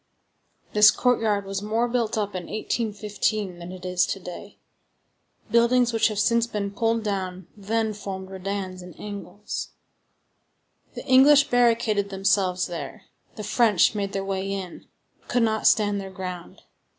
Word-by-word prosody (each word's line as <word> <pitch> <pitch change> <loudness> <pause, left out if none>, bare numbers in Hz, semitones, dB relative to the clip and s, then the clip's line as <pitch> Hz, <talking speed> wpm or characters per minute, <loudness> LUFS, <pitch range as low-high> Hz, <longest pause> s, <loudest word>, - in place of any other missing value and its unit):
This 210 0 +8
courtyard 220 -5 +1
was 195 0 -4
more 220 +3 0
built 235 -2 -1
up 205 -2 0
in 180 -2 -5
1815 210 -3 -2
than 175 +1 -8
it 185 0 -9
is 180 -1 +1
to 195 - -3
day. 180 +3 -9 0.9
Buildings 235 +1 +3
which 225 - +3
have 215 -2 -4
since 235 +2 +2
been 205 -3 -3
pulled 225 +2 0
down 190 -3 -3
then 220 +2 -1
formed 195 -2 -7
redans 190 -1 -4
and 180 -1 -12
angles. 205 -1 -6 1.2
The - - -7
English 280 +2 +6
barricaded 230 -4 +2
themselves 195 -2 +1
there; 180 +4 -7 0.3
the 215 - -6
French 220 -6 +3
made 200 -2 -2
their 195 0 -2
way 195 0 -2
in, 190 -3 -6 0.3
but - - -30
could 245 -1 +2
not 220 -1 +1
stand 205 -2 +3
their 195 - -7
ground. 185 -2 -8
205 Hz, 150 wpm, -25 LUFS, 190-225 Hz, 1.2 s, This